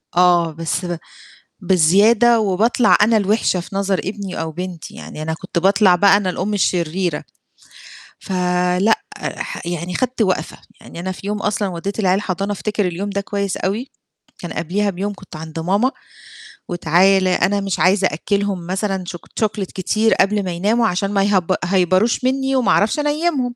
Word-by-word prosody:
آه 175 Hz, -2 st, +4 dB
بس 165 Hz, +3 st, -3 dB
ب 175 Hz, -1 st, -3 dB, 0.7 s
بزيادة 205 Hz, +7 st, +4 dB
وباطلع 215 Hz, +3 st, +3 dB
أنا 220 Hz, +2 st, +4 dB
الوحشة 205 Hz, -2 st, +1 dB
في 180 Hz, +3 st, -8 dB
نظر 195 Hz, -1 st, 0 dB
ابني 195 Hz, -2 st, -5 dB
أو 160 Hz, 0 st, -4 dB
بنتي 180 Hz, 0 st, -7 dB
يعني -, -, -9 dB
أنا 160 Hz, +1 st, -2 dB
كنت 175 Hz, +1 st, -3 dB
باطلع 195 Hz, 0 st, +4 dB
بقى 200 Hz, +2 st, +5 dB
أنا 195 Hz, -3 st, -1 dB
الأم 195 Hz, +3 st, -2 dB
الشريرة. 175 Hz, -4 st, 0 dB, 1.0 s
ف -, -, -9 dB, 0.5 s
لا 220 Hz, +3 st, +3 dB, 0.2 s
ح -, -, -5 dB
يعني 175 Hz, +1 st, -4 dB
خدت 255 Hz, -1 st, -1 dB
وقفة، 185 Hz, -6 st, 0 dB, 0.2 s
يعني -, -, -11 dB
أنا 185 Hz, +2 st, -3 dB
في 195 Hz, +2 st, -8 dB
يوم 210 Hz, -, -1 dB
أصلًا 205 Hz, 0 st, -1 dB
ودِّيت 190 Hz, +4 st, -5 dB
العيال 185 Hz, -3 st, +3 dB
الحضانة 195 Hz, 0 st, -2 dB
أفتكر 205 Hz, 0 st, -1 dB
اليوم 185 Hz, +4 st, -4 dB
ده 200 Hz, 0 st, -2 dB
كويس 200 Hz, -1 st, -3 dB
أوي، 215 Hz, +8 st, -3 dB, 0.5 s
كان 175 Hz, -, -6 dB
قبليها 200 Hz, +5 st, -1 dB
بيوم 200 Hz, +2 st, -3 dB
كنت 190 Hz, -4 st, -13 dB
عند 160 Hz, +1 st, -7 dB
ماما 200 Hz, +10 st, +1 dB, 0.8 s
وتعالَ 185 Hz, +3 st, +3 dB
أنا 195 Hz, +2 st, +1 dB
مش 195 Hz, -2 st, -2 dB
عايزة 190 Hz, +1 st, +3 dB
أأكلهم 195 Hz, +1 st, -2 dB
مثلًا 190 Hz, 0 st, -2 dB
شو 175 Hz, -, -5 dB
chocolate 205 Hz, +1 st, -3 dB
كتير 215 Hz, +4 st, +1 dB
قبل 205 Hz, +1 st, +2 dB
ما 180 Hz, -, -2 dB
يناموا 215 Hz, +7 st, +1 dB
عشان 195 Hz, +1 st, -1 dB
ما 200 Hz, -1 st, +2 dB
يهي 200 Hz, -2 st, +3 dB, 0.2 s
يهيبروش 185 Hz, +6 st, +2 dB
مني 265 Hz, +1 st, 0 dB
وما 255 Hz, -2 st, +2 dB
أعرفش 215 Hz, +8 st, +2 dB
أنيمهم. 295 Hz, -4 st, 0 dB
195 Hz, 165 wpm, -19 LUFS, 180-210 Hz, 1.0 s, بقى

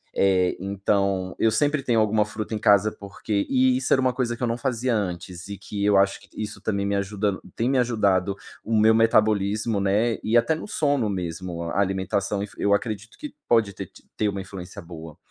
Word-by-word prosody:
eh, 95 Hz, -2 st, +3 dB
então 100 Hz, -1 st, -1 dB
eu 115 Hz, -, +4 dB
sempre 145 Hz, +5 st, +1 dB
tenho 120 Hz, -4 st, +2 dB
alguma 110 Hz, 0 st, +2 dB
fruta 110 Hz, +1 st, -6 dB
em 105 Hz, -, -2 dB
casa 105 Hz, +1 st, +4 dB
porque 100 Hz, +1 st, -3 dB
e 130 Hz, -1 st, +3 dB
isso 130 Hz, -, -3 dB
era 130 Hz, -, +5 dB
uma 130 Hz, -1 st, +2 dB
coisa 120 Hz, -3 st, -2 dB
que -, -, -6 dB
eu -, -, +2 dB
não 115 Hz, +1 st, -1 dB
fazia 125 Hz, -2 st, -1 dB
antes 90 Hz, -2 st, -4 dB
e 100 Hz, -1 st, -6 dB
que 100 Hz, 0 st, -5 dB
eu 100 Hz, -1 st, +4 dB
acho 100 Hz, 0 st, +2 dB, 0.2 s
isso 105 Hz, 0 st, -6 dB
também 100 Hz, -2 st, -1 dB
me 100 Hz, 0 st, 0 dB
ajuda 100 Hz, 0 st, -1 dB, 0.2 s
tem 120 Hz, +3 st, 0 dB
me 135 Hz, -2 st, +2 dB
ajudado 100 Hz, -5 st, +1 dB, 0.3 s
o 115 Hz, 0 st, -1 dB
meu 110 Hz, +1 st, +5 dB
metabolismo, 110 Hz, -1 st, +2 dB
né, 105 Hz, +4 st, +1 dB
e 115 Hz, +2 st, +3 dB
até 120 Hz, +7 st, +3 dB
no 160 Hz, -, -7 dB
sono 145 Hz, -, 0 dB
mesmo. 90 Hz, -2 st, -4 dB
A 100 Hz, -, -1 dB
alimentação 100 Hz, +1 st, -1 dB
influ 105 Hz, -, -10 dB
eu 100 Hz, 0 st, +3 dB
acredito 110 Hz, +1 st, -3 dB
que 300 Hz, -2 st, -8 dB
pode 110 Hz, -4 st, +3 dB
ter 95 Hz, -1 st, -7 dB
ti -, -, -19 dB
ter 105 Hz, -1 st, +1 dB
uma 100 Hz, -1 st, -4 dB
influência 95 Hz, -1 st, -9 dB
boa. 80 Hz, -2 st, -10 dB
105 Hz, 210 wpm, -24 LUFS, 95-115 Hz, 0.3 s, era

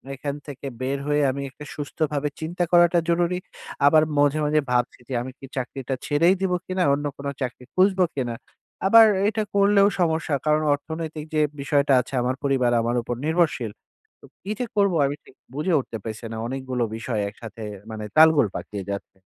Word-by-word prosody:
এখান 140 Hz, +1 st, -4 dB
থেকে 140 Hz, -1 st, -7 dB
বের 135 Hz, +2 st, -1 dB
হয়ে 150 Hz, 0 st, +2 dB
আমি 140 Hz, -, -5 dB
একটা 150 Hz, -, -11 dB
সুস্থভাবে 150 Hz, 0 st, -2 dB
চিন্তা 175 Hz, +3 st, -2 dB
করাটা 175 Hz, 0 st, +5 dB
জরুরি। 175 Hz, +1 st, +1 dB, 0.5 s
আবার 155 Hz, +1 st, +6 dB, 0.2 s
মাঝে, 145 Hz, +1 st, +3 dB
মাঝে 150 Hz, +1 st, +2 dB
ভাবছি 125 Hz, 0 st, 0 dB
যে -, -, -4 dB
আমি 130 Hz, +1 st, -6 dB
কি 135 Hz, -, -9 dB
চাকরিটা 130 Hz, +1 st, -3 dB
ছেড়েই 165 Hz, +5 st, +3 dB
দিবো 185 Hz, -2 st, +1 dB
কিনা? 185 Hz, 0 st, -1 dB
অন্য 145 Hz, +1 st, -1 dB
কোনো 140 Hz, 0 st, -4 dB
চাকরি 125 Hz, -1 st, -4 dB
খুঁজবো 185 Hz, -1 st, +4 dB
কিনা? 120 Hz, -4 st, -2 dB, 0.5 s
আবার 225 Hz, +2 st, +9 dB, 0.2 s
এটা 220 Hz, -1 st, -1 dB
করলেও 200 Hz, 0 st, +5 dB
সমস্যা। 160 Hz, -3 st, +1 dB
কারণ 150 Hz, 0 st, +3 dB
অর্থনৈতিক 160 Hz, +1 st, -6 dB
যে 155 Hz, -, +3 dB, 0.2 s
বিষয়টা 140 Hz, -1 st, +2 dB
আছে 125 Hz, -, -13 dB
আমার 125 Hz, +1 st, 0 dB
পরিবার 130 Hz, -3 st, +2 dB
আমার 120 Hz, +1 st, -1 dB
উপর 120 Hz, +1 st, -4 dB
নির্ভরশীল। 160 Hz, -9 st, +1 dB, 0.5 s
তো -, -, -14 dB, 0.2 s
কি 200 Hz, -, -5 dB
যে 250 Hz, -, 0 dB
করবো 200 Hz, -4 st, +3 dB
আমি 140 Hz, +1 st, -1 dB
ঠিক -, -, -18 dB, 0.2 s
বুঝে 165 Hz, +4 st, 0 dB
উঠতে 120 Hz, -3 st, -6 dB
পারছি 110 Hz, +1 st, -6 dB
না। 110 Hz, -, -5 dB
অনেকগুলো 130 Hz, -1 st, -2 dB
বিষয় 115 Hz, -2 st, -2 dB
একসাথে 110 Hz, +1 st, -10 dB, 0.3 s
মানে 110 Hz, -1 st, -5 dB
তালগোল 160 Hz, -6 st, +7 dB
পাকিয়ে 100 Hz, -2 st, -6 dB
যাচ্ছে। 100 Hz, -1 st, -7 dB
145 Hz, 175 wpm, -24 LUFS, 130-170 Hz, 0.5 s, আবার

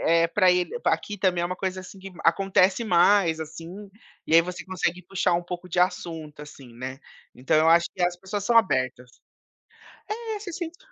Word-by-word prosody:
eh, 165 Hz, 0 st, +3 dB
pra 185 Hz, +1 st, +3 dB
ele 180 Hz, 0 st, +1 dB, 0.2 s
aqui 205 Hz, -1 st, 0 dB
também 180 Hz, -2 st, +1 dB
é -, -, 0 dB
uma 185 Hz, +1 st, -5 dB
coisa 190 Hz, 0 st, -3 dB
assim 185 Hz, +1 st, -12 dB
que 195 Hz, +1 st, -10 dB
acontece 190 Hz, +4 st, +3 dB
mais, 180 Hz, -3 st, +3 dB
assim, 165 Hz, +6 st, -9 dB, 0.4 s
e 160 Hz, -, +1 dB
aí 165 Hz, -, +9 dB
você 180 Hz, +1 st, -6 dB
consegue 180 Hz, -1 st, -2 dB
puxar 185 Hz, -2 st, 0 dB
um 175 Hz, -, 0 dB
pouco 180 Hz, +1 st, -7 dB
de 180 Hz, -, -3 dB
assunto, 165 Hz, -4 st, -1 dB
assim, 140 Hz, -4 st, -12 dB
né, 130 Hz, +2 st, -7 dB, 0.4 s
então 130 Hz, +5 st, 0 dB
eu 160 Hz, +1 st, +4 dB
acho 170 Hz, +1 st, +5 dB
que 185 Hz, -, -3 dB
as 175 Hz, 0 st, +1 dB
pessoas 195 Hz, +2 st, -5 dB
são 235 Hz, +2 st, +2 dB
abertas. 130 Hz, -, +1 dB, 1.0 s
É 425 Hz, -, -2 dB, 0.2 s
você 405 Hz, -4 st, -8 dB
se -, -, -6 dB
sente 345 Hz, -1 st, -6 dB
180 Hz, 200 wpm, -25 LUFS, 165-195 Hz, 1.0 s, aí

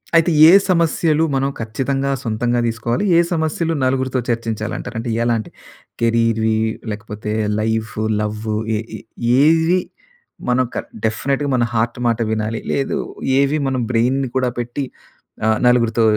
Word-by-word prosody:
అయితే 165 Hz, +1 st, +4 dB, 0.2 s
ఏ -, -, +8 dB, 0.2 s
సమస్యలు 165 Hz, -2 st, +2 dB
మనం 135 Hz, +1 st, +1 dB
ఖచ్చితంగా 135 Hz, +5 st, -2 dB
సొంతంగా 120 Hz, +2 st, 0 dB
తీసుకోవాలి, 115 Hz, -, -1 dB
ఏ -, -, +6 dB
సమస్యలు 165 Hz, +1 st, -1 dB
నలుగురితో 130 Hz, 0 st, 0 dB
చర్చించాలి 115 Hz, -2 st, -2 dB
అంటారు? 125 Hz, -1 st, -7 dB
అంటే 120 Hz, +1 st, -4 dB
ఎలాంటివి? 115 Hz, -2 st, -1 dB, 0.5 s
కెరీర్‌వి, 115 Hz, -1 st, +2 dB, 0.4 s
లేకపోతే 105 Hz, 0 st, -6 dB, 0.3 s
లైఫ్, 110 Hz, 0 st, -1 dB, 0.3 s
లవ్ 105 Hz, 0 st, -3 dB, 0.4 s
ఏ -, -, -2 dB, 0.2 s
ఏ -, -, -12 dB, 0.4 s
ఏవి 165 Hz, +3 st, +4 dB, 0.7 s
మనం 125 Hz, +1 st, +3 dB, 0.4 s
డెఫినిట్‌గా 140 Hz, +6 st, -1 dB
మన 120 Hz, -, +2 dB
హార్ట్ 115 Hz, +2 st, 0 dB
మాట 115 Hz, -1 st, +1 dB
వినాలి? 110 Hz, +1 st, -2 dB
లేదు, 135 Hz, -, -1 dB, 0.4 s
ఏవి 140 Hz, +2 st, +2 dB
మనం 130 Hz, -2 st, -1 dB
బ్రెయిన్‌ని 125 Hz, +3 st, +1 dB
కూడా 125 Hz, -1 st, +1 dB
పెట్టి 120 Hz, +4 st, -3 dB, 0.6 s
ఆహ్, 110 Hz, -1 st, +3 dB
నలుగురితో 115 Hz, -2 st, +3 dB
120 Hz, 130 wpm, -19 LUFS, 110-140 Hz, 0.7 s, ఏ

